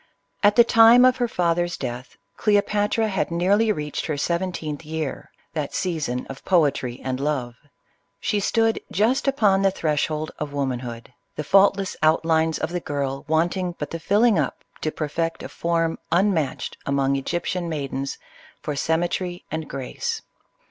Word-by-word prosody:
At 205 0 +5
the 235 - +8
time 230 +2 +7
of 255 0 +4
her 245 -1 +1
father's 175 -4 0
death, 125 -1 -6 0.2
Cleopatra 210 +1 +2
had 195 -3 -1
nearly 195 +6 +2
reached 150 -6 -3
her 155 -3 -2
seventeenth 170 -2 -2
year 155 -2 -4
— - - -40
that 150 -3 -3
season 155 -9 -2
of 135 - -10
poetry 140 -8 +1
and 130 -1 -2
love. 135 -4 -1 0.7
She 210 - 0
stood 225 +2 +2
just 240 +8 +1
upon 210 -8 +3
the 195 - +4
threshold 155 -3 -1
of 150 -1 -4
womanhood,— 125 -3 -4 0.2
the 150 - -3
faultless 195 +3 +3
outlines 160 0 +3
of - - -3
the 180 - -1
girl 140 -3 -3
want 160 +4 +2
ing 180 -2 -3
but 150 - -5
the 165 - -4
filling 205 +3 +3
up 140 - -2 0.2
to 155 - 0
perfect 165 +2 -3
a - - -6
form 165 -1 -1
unmatched 170 -5 0
among 140 0 +1
Egyptian 175 +5 -2
maidens 140 -3 -3 0.4
for 150 - -4
symmetry 175 +4 -1
and 160 -1 -4
grace. 445 - -4
165 Hz, 155 wpm, -23 LUFS, 145-195 Hz, 0.7 s, the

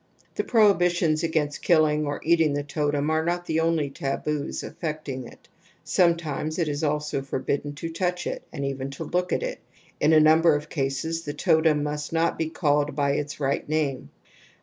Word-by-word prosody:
The - - -1
prohibitions 175 -8 +3
against 155 -3 -1
killing 155 -3 +3
or 145 - -3
eating 165 -2 +3
the 145 0 -1
totem 145 0 -1
are 160 0 +1
not 175 +1 -1
the 160 -1 0
only 160 -3 +1
taboos 145 +2 -3
affecting 150 -6 -5
it; - - -17 0.4
some 170 -2 +3
times 155 -1 -4
it 170 -3 0
is 145 +1 -2
also 150 -2 -1
forbidden 140 +2 -3
to 165 +3 -5
touch 180 +1 -2
it - - -3
and 140 -3 -4
even 135 0 -3
to - - -4
look 180 +3 -1
at - - 0
it; - - -4 0.4
in 150 - +3
a 160 - +7
number 155 +1 +5
of 150 +1 -4
cases 150 +3 -2
the 145 -2 -6
totem 160 -2 +3
must 150 0 -3
not 165 0 +2
be 160 -1 -2
called 150 -3 +1
by 140 -1 +1
its 145 +1 -3
right 140 0 -1
name. 150 -4 -1
155 Hz, 185 wpm, -25 LUFS, 145-165 Hz, 0.4 s, a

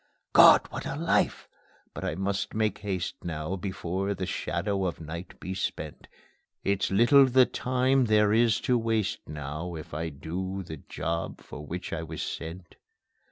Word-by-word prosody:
God! - - +8
What - - -5
a - - -3
life! - - +1 0.5
But - - -6
I 80 - -1
must 100 +3 -2
make 110 -2 0
haste 95 -4 -3
now, 80 +1 -3
Before 95 +1 -2
the 95 - -3
shadow 95 +2 -1
of 90 - -2
night 85 +3 -8
be 95 - -5
spent. 95 - -4 0.6
It's 100 -1 +1
little 120 +8 +6
the 130 0 +6
time 130 +1 +1
there 105 -1 +4
is 115 -1 +4
to 125 -1 +2
waste 115 -2 0
now, 75 +4 -5
If 80 - -9
I'd 80 -2 -4
do 95 +4 -4
the 80 -3 -7
job 85 +4 -4
for 75 - -9
which 90 +4 -5
I 85 - -2
was 80 -1 -5
sent. 85 +2 -7
95 Hz, 160 wpm, -28 LUFS, 85-105 Hz, 0.6 s, God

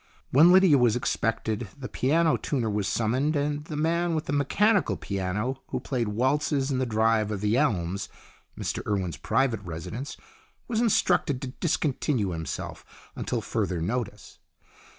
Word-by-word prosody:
When 160 +7 +7
Lydia 185 -6 +6
was 120 -2 +4
expected, 115 -2 -1
the 135 -2 -6
piano 160 +6 +2
tuner 120 -7 -1
was 105 -2 -1
summoned, 125 +9 +1
and 145 +1 -1
the 155 - -6
man 165 +2 +1
with 155 - -2
the 145 - -3
mechanical 200 +9 +2
piano, 105 +7 -3
who - - -3
played 120 -5 -2
waltzes 135 +5 +1
in 130 - 0
the 130 - 0
drive 110 -1 +2
of 105 -2 -3
The 105 +2 +2
Elms 100 - 0 0.5
Mr - - -2
Urwen's 95 -7 -1
private 115 - +1
residence 100 - -6 0.5
was 230 -1 0
instructed 175 - +2
to 130 - -3
discontinue 140 - 0
himself 80 -1 -5 0.3
until - - -2
further 90 -2 -2
notice. 105 +3 -4
125 Hz, 150 wpm, -27 LUFS, 105-150 Hz, 0.5 s, When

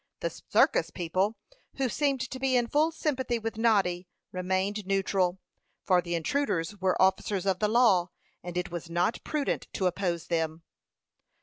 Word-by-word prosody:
The - - -1
circus - - +2
people, 185 +5 -1 0.4
who 270 -1 0
seemed 275 +1 0
to 260 - -5
be 260 -1 +2
in 240 - +2
full 300 +6 +2
sympathy 260 -6 -1
with 225 -1 -5
Noddy, 195 -6 +2 0.2
remained 190 +2 -1
neutral, 190 -2 +1 0.5
for 180 -1 +4
the 175 0 -3
intruders 175 - -1
were 190 -1 0
officers 190 0 +2
of 190 -2 +1
the 210 - +2
law, 210 -7 +4 0.3
and 175 0 -6
it 180 -1 -2
was 170 -1 -6
not 175 +7 0
prudent 300 -2 -2
to 190 - -1
oppose 175 -2 -1
them. 165 -1 -2
190 Hz, 160 wpm, -28 LUFS, 180-235 Hz, 0.5 s, for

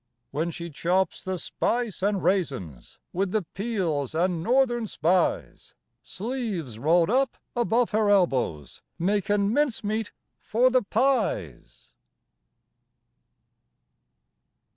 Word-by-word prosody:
When 155 +5 -1
she 170 0 -7
chops 180 +4 0
the 185 0 -2
spice 230 +3 -2
an' 200 -1 +1
raisins, 130 - -2 0.2
With 190 +2 0
the 215 +1 0
peels 175 - -2
an' 175 0 +1
Northern 240 +1 +2
Spies, 180 0 0 0.3
Sleeves 200 - -4
rolled 165 - +3
up 265 +2 +1 0.2
above 240 0 +1
her 215 -1 +2
elbows, 130 - +1 0.2
Makin' 200 +3 +1
mincemeat 225 -6 0 0.3
for 250 +4 +2
the 255 0 +4
pies. 200 - -1
195 Hz, 100 wpm, -26 LUFS, 165-225 Hz, 0.3 s, the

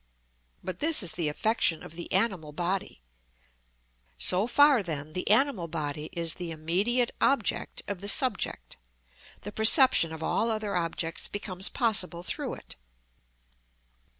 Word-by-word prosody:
But 185 -1 -6
this 315 -6 +5
is 175 - +1
the 165 -3 -1
affection 170 -1 0
of - - -11
the 170 0 -8
animal 180 -10 0
body. 175 - -4 1.1
So 180 - +1
far, 285 0 +4
then, 155 -4 -6
the 180 - -4
animal 220 -5 +2
body 155 -2 -5
is 170 -1 -2
the 175 -2 -7
immediate 190 +10 0
object 270 -6 0
of 200 -3 -5
the 200 - -5
subject; 225 +1 0 0.6
the 205 - -7
perception 220 - +5
of 160 0 -7
all 230 - 0
other 215 -3 -3
objects 165 -1 -3
becomes 195 -2 -3
possible 190 -8 0
through - - -4
it. - - -12
185 Hz, 135 wpm, -27 LUFS, 165-220 Hz, 1.1 s, this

